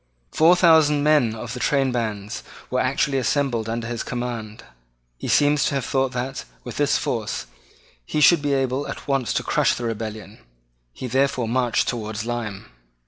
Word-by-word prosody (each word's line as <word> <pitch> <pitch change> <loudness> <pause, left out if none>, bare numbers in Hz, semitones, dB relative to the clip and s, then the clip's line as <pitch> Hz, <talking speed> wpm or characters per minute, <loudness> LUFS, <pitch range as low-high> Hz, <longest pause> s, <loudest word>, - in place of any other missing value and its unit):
Four 165 +3 +5
thousand 160 -4 +5
men 145 -7 +3
of 115 +1 -6
the 125 - -5
trainbands 120 -7 -1 0.3
were 130 - +1
actually 135 +1 +1
assembled 125 -3 0
under 115 0 -3
his 120 0 -3
command. 120 -3 -5 0.6
He - - -5
seems 145 0 +3
to - - 0
have 135 -3 -1
thought 135 -1 0
that, 125 +2 -3 0.2
with - - -7
this - - +2
force, - - -3 0.6
he 150 - -2
should 160 +1 +6
be 145 -1 0
able 135 +1 -1
at - - -7
once 135 -7 0
to - - -1
crush - - +2
the 120 - -6
rebellion. 110 -2 -5 0.5
He 95 - -8
therefore 130 -1 +1
marched 120 0 +1
towards 110 -2 -3
Lyme. 115 -5 -4
125 Hz, 165 wpm, -23 LUFS, 115-140 Hz, 0.6 s, should